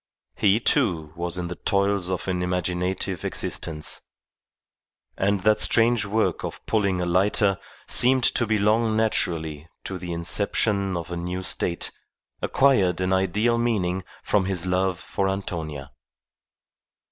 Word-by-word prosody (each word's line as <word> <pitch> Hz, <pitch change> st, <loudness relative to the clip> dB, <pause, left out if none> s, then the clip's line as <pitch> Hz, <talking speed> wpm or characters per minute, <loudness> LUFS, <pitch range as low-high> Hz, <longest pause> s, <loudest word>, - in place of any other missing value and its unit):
He, 105 Hz, +1 st, +3 dB
too, 80 Hz, -9 st, +1 dB
was 85 Hz, 0 st, -2 dB
in 90 Hz, -1 st, -3 dB
the 90 Hz, -, -6 dB
toils 100 Hz, -2 st, +1 dB
of 95 Hz, 0 st, -3 dB
an 90 Hz, -1 st, -1 dB
imaginative 90 Hz, +1 st, -1 dB
existence, 75 Hz, -2 st, -2 dB, 1.1 s
and 100 Hz, 0 st, +1 dB
that 105 Hz, +2 st, +3 dB
strange 115 Hz, -1 st, +3 dB
work 110 Hz, +2 st, 0 dB
of -, -, -6 dB
pulling 100 Hz, -4 st, +1 dB
a 90 Hz, -, -1 dB
lighter 95 Hz, +2 st, +2 dB, 0.3 s
seemed 130 Hz, +1 st, +4 dB
to 120 Hz, -, +2 dB
belong 110 Hz, +1 st, +2 dB
naturally 80 Hz, -8 st, -1 dB
to 95 Hz, -2 st, -5 dB
the 90 Hz, -1 st, -6 dB
inception 100 Hz, +2 st, 0 dB
of 85 Hz, +1 st, -6 dB
a 85 Hz, -, -3 dB
new 90 Hz, +2 st, -4 dB
state, 85 Hz, -1 st, -2 dB, 0.5 s
acquired 100 Hz, -11 st, +3 dB
an 95 Hz, 0 st, 0 dB
ideal 105 Hz, +6 st, +1 dB
meaning 95 Hz, -6 st, 0 dB, 0.2 s
from 100 Hz, -3 st, +1 dB
his 95 Hz, -2 st, -1 dB
love 90 Hz, 0 st, 0 dB
for 95 Hz, 0 st, -2 dB
Antonia. 80 Hz, -8 st, -5 dB
95 Hz, 135 wpm, -24 LUFS, 90-105 Hz, 1.1 s, seemed